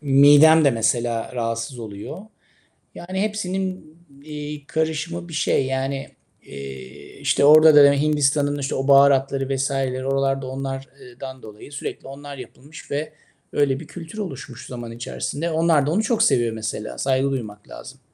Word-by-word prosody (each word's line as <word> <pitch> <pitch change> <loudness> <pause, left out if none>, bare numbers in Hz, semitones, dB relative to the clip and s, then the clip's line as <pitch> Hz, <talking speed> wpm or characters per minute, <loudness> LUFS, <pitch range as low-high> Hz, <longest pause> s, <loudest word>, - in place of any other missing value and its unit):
midem 145 +3 +6
de 140 - +5
mesela 115 0 -1
rahatsız 115 +1 -3
oluyor. 105 - -8 0.8
Yani 185 +2 -4
hepsinin, 190 -5 -3 0.3
iii, 150 -1 -7
karışımı 160 +3 -3
bir 165 - -9
şey. 145 -3 +1
Yani, 135 +1 -3 0.3
eee, 65 -2 -10
işte, 140 - +2
orada 155 +1 +8
da, 140 - +8
hani, 140 0 +1
Hindistan'ın, 145 -1 +1
işte, 135 - -2
o 135 +1 -2
baharatları 135 -1 +4
vs.leri 135 -1 -2
oralarda 135 -1 0
onlar 135 0 -5
eee, 125 0 -15
dan 130 -1 -8
dolayı 105 +5 -12
sürekli 140 -1 -6
onlar 140 +1 -9
yapılmış 135 +4 -12
ve 150 +2 -3 0.4
öyle 140 -2 +1
bir 155 - -11
kültür 170 +4 -10
oluşmuş 135 - -7
zaman 120 -2 -7
içerisinde. 145 +7 -4
Onlar 160 -3 +3
da - - 0
onu 210 +6 +1
çok 225 +1 +2
seviyor 120 -2 +2
mesela. 110 -1 -5
Saygı 135 +1 +1
duymak 105 -6 -6
lazım. - - -11
140 Hz, 150 wpm, -22 LUFS, 130-155 Hz, 0.8 s, orada